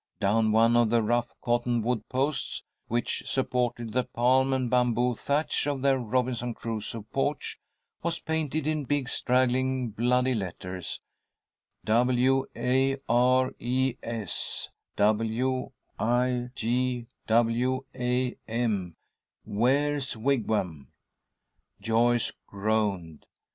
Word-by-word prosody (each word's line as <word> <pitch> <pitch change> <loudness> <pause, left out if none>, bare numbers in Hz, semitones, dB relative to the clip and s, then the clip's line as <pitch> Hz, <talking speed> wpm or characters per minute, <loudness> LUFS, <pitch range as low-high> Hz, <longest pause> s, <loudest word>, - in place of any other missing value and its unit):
Down 110 +2 +2
one 115 +2 +4
of 120 -2 +4
the 115 0 +3
rough 120 +2 +1
cottonwood 120 -1 0
posts, 135 +4 -1 0.2
which 120 +1 -1
supported 120 -3 -1
the 125 +1 +2
palm 130 +3 +2
and 130 -1 +1
bamboo 125 0 +2
thatch 145 +5 -1
of 140 -2 -2
their 135 -1 +3
Robinson 125 0 -1
Crusoe 115 -1 -4
porch, 145 +2 -1 0.4
was 170 +1 -1
painted 155 -2 -2
in 155 -2 -1
big, 145 -1 0
straggling, 130 -1 +1
bloody 125 +4 +2
letters: 90 -3 -5 0.8
"W 125 +4 +3
A 130 +3 +1
R 130 +2 +3
E 130 +1 +1
S 115 -5 -2 0.3
W 115 +5 +1 0.3
I 125 +1 +1
G 125 +1 0 0.2
W 120 +3 +2
A 125 0 0
M." 110 -7 -1 2.8
Joyce 115 +2 +2 0.2
groaned. 100 -6 -1
120 Hz, 100 wpm, -28 LUFS, 115-130 Hz, 2.8 s, one